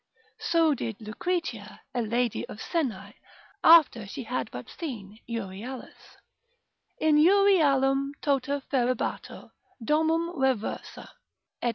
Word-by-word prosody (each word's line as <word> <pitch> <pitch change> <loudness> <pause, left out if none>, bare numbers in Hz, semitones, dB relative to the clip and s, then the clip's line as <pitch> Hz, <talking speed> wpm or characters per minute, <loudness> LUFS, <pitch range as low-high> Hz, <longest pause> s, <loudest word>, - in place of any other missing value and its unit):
So 330 -2 +3
did 230 -5 -5
Lucretia, 335 +11 -4
a 245 - 0
lady 235 +1 -1
of - - -8
Senae, 215 - -3 0.5
after 305 -10 +6
she 225 - -6
had 250 +3 -3
but - - -8
seen 220 - -7
Euryalus, 230 +3 -7 0.8
in 310 -1 +3
Eurialum 295 -7 +4
tota 280 0 -1
ferebatur, 255 -2 -2 0.3
domum 320 +6 +1
reversa, 265 -6 -2 0.6
&c. 240 - +2
270 Hz, 100 wpm, -27 LUFS, 230-315 Hz, 0.8 s, after